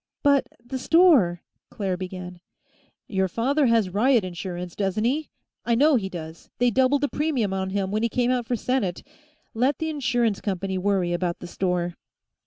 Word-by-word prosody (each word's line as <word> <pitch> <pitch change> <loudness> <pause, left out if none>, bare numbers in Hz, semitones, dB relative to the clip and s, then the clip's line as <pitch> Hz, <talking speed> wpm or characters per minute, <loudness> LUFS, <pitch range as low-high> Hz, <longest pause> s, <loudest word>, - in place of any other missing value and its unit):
"But 280 -2 +4 0.2
the 260 +2 -4
store 270 - +4
" - - -62
Claire 195 -3 -2
began. 180 -1 -7 0.7
"Your 190 -2 0
father 265 - +1
has 225 -5 +2
riot 235 +3 +3
insurance, 180 -1 -6
doesn't 200 +1 -1
he? 285 +6 0 0.3
I 235 - +1
know 295 +4 +5
he 195 -6 -1
does; 160 -2 -9
they 245 0 +3
doubled 260 +4 +3
the 290 - +2
premium 275 -10 -1
on 190 0 -2
him 195 0 -2
when 215 +1 0
he 235 - +1
came 245 +2 +1
out 245 -2 -1
for 245 - 0
Senate. 225 -6 -1 0.5
Let 255 +5 +1
the 320 0 -2
insurance 240 -7 0
company 190 -1 -2
worry 185 -2 +1
about 175 0 -1
the - - -10
store." 175 -1 -1
210 Hz, 180 wpm, -24 LUFS, 185-255 Hz, 0.7 s, know